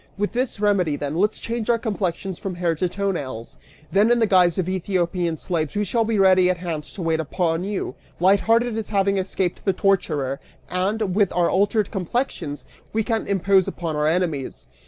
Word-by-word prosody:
With 205 +1 -1
this 250 -3 -2
remedy, 195 -7 +2
then, 145 +1 -4
let's 205 +5 +1
change 230 -1 -4
our 235 - +4
complexions, 195 -5 -3
from 190 -2 -4
hair 175 -1 0
to 175 +3 -1
toe 200 +2 -1
nails! 130 -9 -6 0.4
Then, 205 +4 +4
in 240 - +5
the 230 - +3
guise 180 -4 +4
of 185 -2 0
Ethiopian 180 -2 -1
slaves, 160 -1 -2
we 210 - +1
shall 225 +3 +1
be 225 -1 0
ready 185 -2 +5
at 185 - +1
hand 170 -3 -4
to 185 - -8
wait 165 -1 +1
upon 165 +2 -1
you, 200 0 -3 0.3
light 190 +3 +5
hearted 230 +1 +2
as 220 - -6
having 200 -1 +2
escaped 185 -1 -2
the 195 - +2
torturer, 155 -9 0 0.3
and, 195 +2 0
with 200 -1 +2
our 175 -1 +2
altered 205 +1 +1
complexions, 185 - -3 0.3
we 220 0 +1
can 225 0 -1
impose 195 -1 +3
upon 165 -3 -3
our 150 0 +1
enemies!" 160 -5 -1
185 Hz, 195 wpm, -23 LUFS, 170-205 Hz, 0.4 s, in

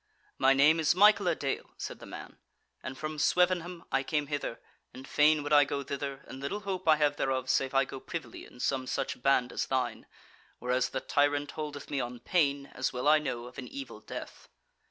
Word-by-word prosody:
"My 135 +1 +5
name 150 +4 +5
is 160 +1 +3
Michael 205 0 +6
a 170 - +3
dale," 140 -3 -4
said - - -6
the - - -11
man, - - -10 0.4
"and 130 0 -6
from 155 +1 -4
Swevenham 180 0 +2
I 135 - +2
came 150 +1 -1
hither, 145 -5 -4 0.4
and 130 +1 -10
fain 150 0 +4
would 145 - -1
I 145 0 +8
go 140 0 -3
thither, 140 0 -5
and 130 - -9
little 140 +10 -3
hope 190 -4 -4
I 155 - +7
have 150 -1 +1
thereof 130 -1 0
save 135 0 0
I 135 0 +4
go 135 - -8
privily - - -7
in - - -15
some 130 0 -1
such - - -3
band 125 -2 +2
as - - -2
thine, 125 -3 -2 0.5
whereas 125 +1 0
the 130 - -3
tyrant 145 0 +1
holdeth 150 -2 -6
me 140 - 0
on 120 0 -5
pain, 140 -1 +1
as 130 - -1
well 125 +3 -2
I 155 +1 +7
know, 120 -5 -4
of 125 - -10
an 125 - -6
evil 275 0 -8
death." - - -9
140 Hz, 210 wpm, -30 LUFS, 130-155 Hz, 0.5 s, I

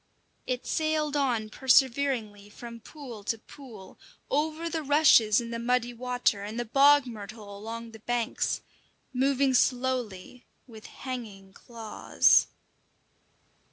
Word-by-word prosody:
It 255 -1 -3
sailed 310 -2 -1
on 245 -6 0
perseveringly 250 -6 +1
from 235 +2 -10
pool 240 -4 -11
to 225 - -1
pool, 225 -5 -14 0.3
over 315 +3 -1
the 325 -1 -2
rushes 285 -7 +5
in 235 -1 -6
the 230 - -4
muddy 245 0 0
water 245 -3 -1
and 215 +3 -5
the 240 - -2
bog 280 +4 +5
myrtle 210 -3 -9
along 225 +3 -7
the 220 - -12
banks, 240 +1 -2 0.5
moving 270 +1 +2
slowly, 250 -4 -1 0.2
with 220 -4 -13
hanging 210 -7 -8
claws. 225 -2 +2
240 Hz, 120 wpm, -28 LUFS, 220-270 Hz, 0.5 s, rushes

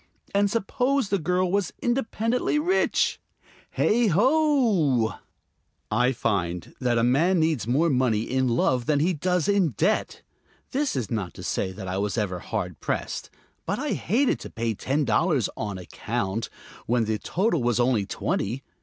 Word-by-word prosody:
And 200 0 +3
suppose 245 +3 0
the 200 - +1
girl 180 +2 0
was 200 -3 0
independently 240 +1 0
rich? 355 +6 +1 0.5
Heigh 235 +1 +3
ho! 210 - +3 0.8
I 125 +4 +3
find 90 -8 -2
that 120 -2 +1
a 115 - +2
man 160 +9 +3
needs 155 - +1
more 145 +8 +3
money 125 -7 +2
in 130 +2 0
love 120 0 +1
than 150 -2 +3
he 175 +5 +2
does 180 +2 0
in 195 - +2
debt. - - 0 0.5
This 280 - 0
is 120 -7 -3
not 105 -6 -3
to - - -9
say 95 - -1
that 95 0 -7
I 95 +1 -2
was 105 +2 -1
ever 95 -5 -1
very - - -14
hard - - -3
pressed; - - -3 0.4
but - - 0
I - - -3
hated 245 - +1
to - - -8
pay 115 0 -2
ten 140 +7 -1
dollars 130 - +2
"on 105 -3 -4
account" 105 +3 -3 0.4
when 120 -1 +2
the 110 -1 -1
total 180 - 0
was 120 -1 +1
only 120 -5 +2
twenty. 120 +7 -2
135 Hz, 165 wpm, -25 LUFS, -, 0.8 s, And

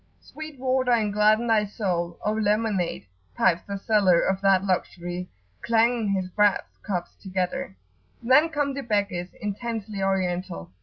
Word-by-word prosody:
"Sweet 310 -2 -10
water, 255 -1 +1
and 215 -3 +1
gladden 215 +2 +4
thy 220 -2 +3
soul, 180 -5 -2
O 210 - +2
lemonade!" 210 - 0 0.3
pipes 170 - +3
the 200 0 -3
seller 195 -4 +3
of 190 0 0
that 195 -1 +4
luxury, 180 -1 -2 0.3
clanging 230 0 +2
his 190 -2 0
brass 205 +1 +3 0.2
cups 180 -4 -4
together. 185 - -3 0.5
Then 265 +7 +5
come 290 -3 -1
the 275 - -4
beggars, 200 -6 -1
intensely 210 -1 -4
Oriental. 180 - -2
205 Hz, 140 wpm, -25 LUFS, 185-230 Hz, 0.5 s, Then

